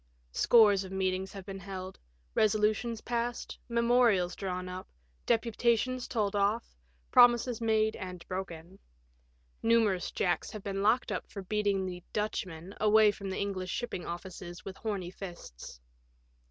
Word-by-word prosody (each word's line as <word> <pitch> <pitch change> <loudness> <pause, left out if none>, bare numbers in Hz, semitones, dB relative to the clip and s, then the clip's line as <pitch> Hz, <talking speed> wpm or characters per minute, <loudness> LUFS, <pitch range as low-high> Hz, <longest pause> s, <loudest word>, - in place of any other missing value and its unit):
Scores 205 - +5
of 190 - -9
meetings 190 0 -1
have 195 -2 -8
been 195 -1 -6
held, 190 -1 -7 0.3
resolutions 215 +2 +2
passed, 240 0 -3
memorials 235 -6 +3
drawn 185 -2 -4
up, 185 +1 -7 0.4
deputations 235 +2 +1
told 210 -4 -1
off, 205 +3 0 0.4
pro 245 - +10
mises 240 -1 -3
made 220 -1 +2
and 180 -2 -7
broken. 185 -1 -6 0.8
Numerous 225 -5 +3
Jacks 175 -2 0
have 210 -2 -8
been 195 -1 -2
locked 220 +5 +2
up - - -4
for 200 - -7
beating 200 -1 0
the 180 -1 -5
" - - -38
Dutchman 190 -4 -3
" - - -15
away 215 0 +6
from 200 -1 -7
the 190 - -3
English 190 -2 -2
shipping 240 -3 -3
offices 175 0 -7
with 190 - -6
horny 195 -5 -3
ffsts. 175 - -9
200 Hz, 145 wpm, -31 LUFS, 185-220 Hz, 0.8 s, pro